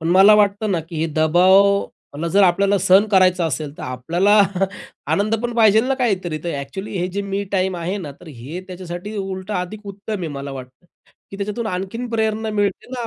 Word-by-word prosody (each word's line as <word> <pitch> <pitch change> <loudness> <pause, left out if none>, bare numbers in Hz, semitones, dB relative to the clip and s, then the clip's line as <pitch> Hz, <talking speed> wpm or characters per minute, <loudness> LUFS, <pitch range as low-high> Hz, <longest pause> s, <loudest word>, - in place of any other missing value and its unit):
पण 165 - -2
मला 195 +4 +7
वाटतं 210 0 +2
ना 170 - 0
की 170 - -7
हे 165 - +1
दबावला 175 +1 +2
जर 200 +4 +4
आपल्याला 195 +2 +3
सहन 195 +3 +4
करायचं 185 -2 +4
असेल, 150 0 -4
तर - - -7
आपल्याला 170 +12 +2 0.7
आनंद 210 +2 +1
पण 240 0 -3
पाहिजेल 220 0 +5
ना 270 - +2
काहीतरी 190 - -1
तर 170 - -2
ॲक्चुअली 190 +8 -6
हे 180 - 0
जे 200 +1 -2
मी 200 0 -3
टाईम 185 -1 0
आहे 175 +4 -3
ना, 150 -6 -7
तर 155 - -18
हे 145 +6 -8
त्याच्यासाठी 185 +3 -7
उलटं 190 +1 -4
अधिक 200 +4 -5
उत्तम 200 +2 -6
आहे 165 - -3
मला 140 -1 -6
वाटतं. 130 +4 -11 0.4
की 195 - -8
त्याच्यातून 210 +3 -3
आणखीन 195 +6 -4
प्रेरणा 220 -1 -1
मिळते 205 -2 -1
ना 240 -2 -4
190 Hz, 195 wpm, -20 LUFS, 170-205 Hz, 0.7 s, मला